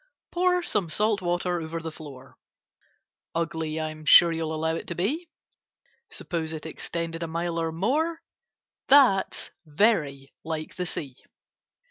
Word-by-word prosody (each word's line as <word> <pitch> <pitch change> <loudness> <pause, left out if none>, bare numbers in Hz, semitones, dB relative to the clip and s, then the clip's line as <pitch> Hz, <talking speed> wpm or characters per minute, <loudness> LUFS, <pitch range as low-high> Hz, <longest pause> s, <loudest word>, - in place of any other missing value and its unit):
Pour 360 0 +2
some 200 - 0
salt 210 +4 +2
water 175 0 -1
over 165 +1 -4
the 160 0 -6
floor— 140 -4 -12 1.0
Ugly 160 -1 -2
I'm 155 0 -5
sure 170 +2 +8
you'll 160 -1 -2
allow 160 +1 0
it 165 - -5
to 170 - -4
be: 290 - -1 0.8
Suppose 160 -3 -4
it 155 0 -6
extended 165 +1 -5
a 165 - -2
mile 170 +1 -2
or 165 -1 -1
more, 290 - 0 0.6
That's 260 -9 +4
very 150 -5 +1
like 160 -1 -4
the 180 -1 -3
Sea. 135 -7 -4
165 Hz, 135 wpm, -26 LUFS, 160-195 Hz, 1.0 s, sure